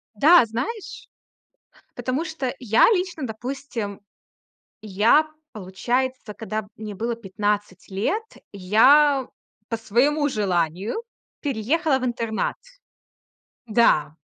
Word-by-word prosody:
Да, 310 Hz, +5 st, +6 dB
знаешь, 390 Hz, -, -5 dB, 0.9 s
потому 265 Hz, +6 st, -2 dB
что 310 Hz, -6 st, -3 dB
я 230 Hz, -3 st, +4 dB
лично, 360 Hz, -7 st, -1 dB
допустим, 235 Hz, -3 st, -5 dB, 0.8 s
я, 215 Hz, +9 st, +3 dB, 0.2 s
получается, 235 Hz, +4 st, -3 dB
когда 215 Hz, -1 st, -5 dB
мне 210 Hz, -2 st, -7 dB
было 230 Hz, +3 st, -2 dB
15 205 Hz, -2 st, -3 dB
лет, 205 Hz, -, -1 dB, 0.3 s
я 260 Hz, +8 st, +4 dB, 0.4 s
по 230 Hz, -, -1 dB
своему 275 Hz, +7 st, +1 dB
желанию 190 Hz, -, -1 dB, 0.4 s
переехала 275 Hz, +3 st, 0 dB
в 255 Hz, -, -3 dB
интернат. 230 Hz, -2 st, -2 dB, 1.1 s
Да. 185 Hz, -10 st, +3 dB
230 Hz, 90 wpm, -23 LUFS, 210-280 Hz, 1.1 s, Да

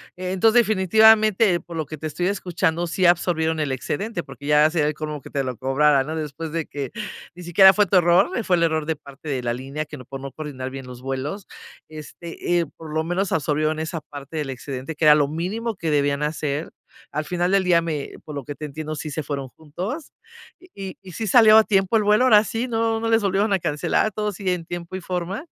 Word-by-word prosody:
entonces, 190 Hz, +6 st, +3 dB
definitivamente, 215 Hz, -1 st, +4 dB
por 170 Hz, -, -11 dB
lo 160 Hz, -2 st, -2 dB
que 155 Hz, +2 st, -8 dB
te 155 Hz, -, -4 dB
estoy 155 Hz, +4 st, -2 dB
escuchando 175 Hz, -3 st, -1 dB
sí 185 Hz, +2 st, 0 dB
absorbieron 165 Hz, -2 st, +2 dB
el 140 Hz, -3 st, -1 dB
excedente, 175 Hz, -, -3 dB
porque 145 Hz, -, -12 dB
ya 150 Hz, 0 st, +5 dB
se 165 Hz, -, -10 dB
sería 150 Hz, -2 st, +3 dB
el 150 Hz, -, 0 dB
colmo 150 Hz, -1 st, -5 dB
que -, -, -12 dB
te 140 Hz, -, -1 dB
lo 130 Hz, -2 st, -4 dB
cobrara, 135 Hz, +1 st, +3 dB
¿no?, 155 Hz, +2 st, -4 dB
después 155 Hz, 0 st, -5 dB
de 165 Hz, -2 st, -2 dB
que 140 Hz, -2 st, -6 dB, 0.4 s
ni 180 Hz, -, -10 dB
siquiera 190 Hz, +3 st, +7 dB
fue 210 Hz, -1 st, +3 dB
tu 190 Hz, 0 st, +3 dB
error, 175 Hz, -, +4 dB
eh, 235 Hz, -, -1 dB
fue 180 Hz, -, +3 dB
el 170 Hz, -, +1 dB
error 160 Hz, -2 st, +1 dB
de 160 Hz, 0 st, -1 dB
parte 140 Hz, +1 st, -14 dB
de 135 Hz, -4 st, -2 dB
la 120 Hz, 0 st, 0 dB
línea 135 Hz, +5 st, -5 dB
que 150 Hz, -1 st, -10 dB
no 125 Hz, -, -12 dB
por 135 Hz, +2 st, -8 dB
no 135 Hz, -, -7 dB
coordinar 135 Hz, -4 st, -6 dB
bien 135 Hz, -1 st, -8 dB
los 125 Hz, -1 st, -10 dB
vuelos, 135 Hz, +9 st, -4 dB, 0.4 s
este, 165 Hz, +3 st, -4 dB
eh, 170 Hz, -, 0 dB
por 160 Hz, -2 st, -9 dB
lo 160 Hz, 0 st, 0 dB
menos 175 Hz, +4 st, -1 dB
absorbieron 155 Hz, 0 st, 0 dB
esa 160 Hz, +1 st, -3 dB
parte 145 Hz, +1 st, -9 dB
del 145 Hz, -3 st, -3 dB
excedente 135 Hz, +3 st, -6 dB
que 160 Hz, -, -5 dB
era 150 Hz, -1 st, +8 dB
lo 145 Hz, -2 st, +2 dB
mínimo 200 Hz, +9 st, -3 dB
que 165 Hz, -4 st, -3 dB
debían 145 Hz, 0 st, +1 dB
hacer, 150 Hz, 0 st, -2 dB, 0.4 s
al 150 Hz, +1 st, -2 dB
final 175 Hz, +1 st, -1 dB
del 195 Hz, -1 st, +3 dB
día 170 Hz, -2 st, +3 dB
me 150 Hz, -4 st, -4 dB
por 150 Hz, -, -8 dB
lo 140 Hz, -, -5 dB
que 145 Hz, +2 st, -7 dB
te 155 Hz, -, -7 dB
entiendo 155 Hz, +1 st, -5 dB
sí 150 Hz, 0 st, -6 dB
se 155 Hz, -, -3 dB
fueron 140 Hz, -2 st, -5 dB
juntos, 180 Hz, -, -7 dB, 0.5 s
¿y 195 Hz, -, -9 dB
y 185 Hz, -, -10 dB
sí 220 Hz, +6 st, -4 dB
salió 220 Hz, +1 st, +7 dB
a 220 Hz, -, +7 dB
tiempo 195 Hz, +1 st, +2 dB
el 215 Hz, -, +1 dB
vuelo 210 Hz, +4 st, +4 dB
ahora 215 Hz, -5 st, +6 dB
sí?, 225 Hz, +3 st, -3 dB
¿no 225 Hz, -1 st, 0 dB
no 225 Hz, 0 st, -2 dB
les 225 Hz, -1 st, +3 dB
volvieron 200 Hz, +1 st, +1 dB
a 190 Hz, -, +2 dB
cancelar 150 Hz, -2 st, 0 dB
a 215 Hz, -, -4 dB
todos 210 Hz, -2 st, -3 dB
y 195 Hz, -2 st, -1 dB
en 175 Hz, -2 st, -3 dB
tiempo 175 Hz, +1 st, -6 dB
y 185 Hz, -, -5 dB
forma? 180 Hz, -, -4 dB
165 Hz, 240 wpm, -23 LUFS, 150-190 Hz, 0.5 s, era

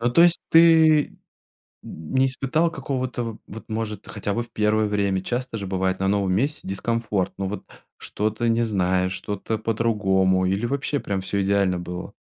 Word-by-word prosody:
Ну 120 Hz, +1 st, +1 dB
то 170 Hz, -, +6 dB
есть 175 Hz, 0 st, +5 dB
ты 160 Hz, -2 st, +5 dB, 0.7 s
не 105 Hz, +13 st, -1 dB
испытал 135 Hz, +5 st, 0 dB
какого-то, 130 Hz, -6 st, -3 dB
в 115 Hz, -2 st, -6 dB
вот 115 Hz, +3 st, -10 dB
может, 110 Hz, -2 st, -4 dB
хотя 100 Hz, -1 st, -3 dB
бы 120 Hz, -, -1 dB
в 120 Hz, -, -14 dB
первое 105 Hz, 0 st, +1 dB
время, 100 Hz, -2 st, 0 dB
часто 125 Hz, +1 st, -3 dB
же 100 Hz, -, -5 dB
бывает, 95 Hz, 0 st, -1 dB
на 95 Hz, -, +1 dB
новом 100 Hz, -2 st, +1 dB
месте 140 Hz, +9 st, 0 dB
дискомфорт, 105 Hz, -1 st, -1 dB
ну 95 Hz, -, -2 dB
вот, 105 Hz, -, -6 dB, 0.3 s
что-то 110 Hz, +3 st, -2 dB
не 115 Hz, +1 st, +2 dB
знаешь, 95 Hz, -3 st, +1 dB
что-то 105 Hz, +3 st, -4 dB
по-другому 100 Hz, -5 st, +1 dB
или 100 Hz, +5 st, 0 dB
вообще 140 Hz, +2 st, -2 dB
прям 100 Hz, -1 st, -2 dB
всё 100 Hz, +1 st, -1 dB
идеально 95 Hz, -2 st, +1 dB
было? 90 Hz, 0 st, -7 dB
105 Hz, 170 wpm, -23 LUFS, 95-120 Hz, 0.7 s, то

